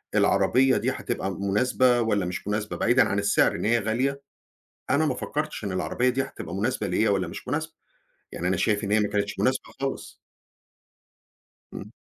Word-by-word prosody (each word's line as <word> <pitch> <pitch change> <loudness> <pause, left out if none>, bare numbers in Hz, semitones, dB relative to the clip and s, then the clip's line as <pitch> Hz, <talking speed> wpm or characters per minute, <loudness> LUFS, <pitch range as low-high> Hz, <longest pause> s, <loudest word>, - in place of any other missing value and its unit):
العربيّة 130 +7 +3
دي - - 0
هتبقى 95 - -3
مناسبة 120 +5 +2
والّا 105 -4 +1
مش 90 +2 -5
مناسبة 105 0 -2
بعيدًا 125 +2 +4
عن 100 - 0
السِّعر 100 - +3
إن - - -3
هي 120 +2 +3
غالية، 130 +6 -1 0.7
أنا 145 +4 +3
ما - - 0
فكّرتش 150 -4 -4
إن 100 - -3
العربيّة 125 +7 0
دي 130 +2 0
هتبقى 85 - -8
مناسبة 110 +6 -1
ليَّ 110 - +1
والّا 100 -2 +1
مش - - -9
مناسبة، 160 +5 -2 0.6
يعني 90 - -2
أنا 95 - +1
شايف 105 +3 +1
إن 100 - -2
هي 110 - +4
ما 105 - +1
كانتش 100 0 -2
مناسبة - - +1 0.2
خالص. - - -4 1.6
امم. - - -9
110 Hz, 175 wpm, -25 LUFS, 100-130 Hz, 1.6 s, بعيدًا